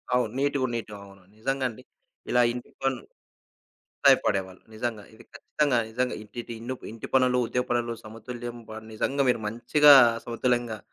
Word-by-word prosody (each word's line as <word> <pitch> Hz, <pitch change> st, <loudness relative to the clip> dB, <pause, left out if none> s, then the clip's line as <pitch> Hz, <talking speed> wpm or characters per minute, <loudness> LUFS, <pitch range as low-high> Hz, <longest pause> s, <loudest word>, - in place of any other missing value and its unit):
అవును. 120 Hz, -3 st, +1 dB
నీటుగ 140 Hz, -1 st, +1 dB
నీటు 110 Hz, -2 st, -5 dB
అవును. 100 Hz, -1 st, -16 dB, 0.2 s
నిజంగండి. 130 Hz, 0 st, -2 dB, 0.5 s
ఇలా 125 Hz, -, +4 dB
ఇంటి 125 Hz, 0 st, -8 dB
పను 135 Hz, -1 st, 0 dB, 1.1 s
సాయపడేవాళ్ళు. 95 Hz, -9 st, +3 dB
నిజంగా. 110 Hz, -2 st, -4 dB
ఇది 120 Hz, +2 st, -16 dB
ఖచ్చితంగా, 145 Hz, -5 st, 0 dB
నిజంగా 125 Hz, +2 st, -1 dB
ఇటిటి 115 Hz, +3 st, -8 dB
ఇన్ను 120 Hz, +3 st, -4 dB, 0.2 s
ఇంటి 115 Hz, -, -8 dB
పనులు, 125 Hz, -1 st, +4 dB
ఉద్య 125 Hz, +2 st, -1 dB
పనులు 120 Hz, -1 st, 0 dB
సమతుల్యం 120 Hz, +2 st, -8 dB
పడ్ 110 Hz, 0 st, -9 dB
నిజంగా 140 Hz, +6 st, 0 dB
మీరు 120 Hz, -, -1 dB
మంచిగా 145 Hz, +7 st, +6 dB, 0.3 s
సమతుల్యంగా 120 Hz, -1 st, -1 dB
120 Hz, 135 wpm, -26 LUFS, 110-130 Hz, 1.1 s, మంచిగా